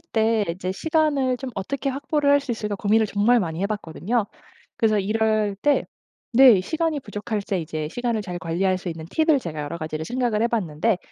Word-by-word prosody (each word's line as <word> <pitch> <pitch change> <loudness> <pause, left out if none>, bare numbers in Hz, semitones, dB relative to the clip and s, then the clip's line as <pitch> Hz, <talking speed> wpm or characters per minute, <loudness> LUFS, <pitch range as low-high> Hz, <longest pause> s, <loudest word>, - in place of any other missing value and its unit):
때 225 -8 +1
이제 185 +2 -4
시간을 290 -1 +1
좀 265 0 -6
어떻게 275 +8 -2
확보를 285 +1 0
할 285 - +6
수 275 - -7
있을까 210 -2 -3
고민을 215 +2 +2
정말 215 +4 +3
많이 165 -2 -3
해 200 - +2
봤거든요. 210 +2 -2 0.5
그래서 215 -2 +2
이럴 215 0 +1
때 290 +8 +2 0.5
네 250 -6 +8
시간이 315 - -1
부족할 210 -1 -4
때 195 -1 -2
이제 155 -2 -4
시간을 235 +1 -1
잘 180 -3 -5
관리할 180 +2 0
수 180 -1 -5
있는 160 -1 -7
팁을 315 -2 +3
제가 155 -7 -5
여러 150 +3 -5
가지를 155 0 -4
생각을 240 -1 0
해 - - +4
봤는데 195 -3 0
215 Hz, 390 characters per minute, -23 LUFS, 185-255 Hz, 0.5 s, 네